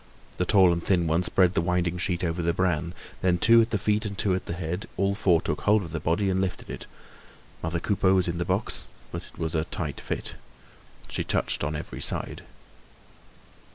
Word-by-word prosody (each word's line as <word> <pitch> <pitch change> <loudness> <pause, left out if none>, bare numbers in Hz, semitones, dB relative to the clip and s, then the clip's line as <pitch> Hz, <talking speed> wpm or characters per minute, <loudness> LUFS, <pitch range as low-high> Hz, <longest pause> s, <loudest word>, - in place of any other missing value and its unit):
The 90 - +1
tall 95 -2 +5
and 85 0 -3
thin 90 -3 +2
one 80 +2 +2
spread 90 0 +3
the - - +2
winding 90 0 0
sheet 90 -1 -1
over 85 0 -1
the 85 0 +1
bran. 85 -2 0 0.3
Then, 90 -1 +3
two 115 +6 +6
at 115 - +1
the 110 - +1
feet 105 +2 +1
and 100 -2 -5
two 100 -3 +2
at 90 - -2
the - - -2
head, 85 +3 -3
all 100 0 +2
four 90 -5 +3
took 75 - -2
hold 105 0 +3
of 85 - -8
the 80 - -2
body 85 +6 +1
and 95 0 +1
lifted 95 -1 -3
it. - - -7 0.7
Mother 80 +1 -1
Coupeau 95 0 +2
was 90 -2 +2
in 85 0 -2
the - - +1
box, 95 +4 -2 0.3
but - - -6
it - - -19
was 80 -1 -2
a 80 -1 +1
tight 75 -5 -4
fit. - - -4 0.7
She - - -2
touched - - 0
on 75 +1 -1
every 75 - -6
side. - - -1
90 Hz, 215 wpm, -27 LUFS, 85-95 Hz, 0.7 s, two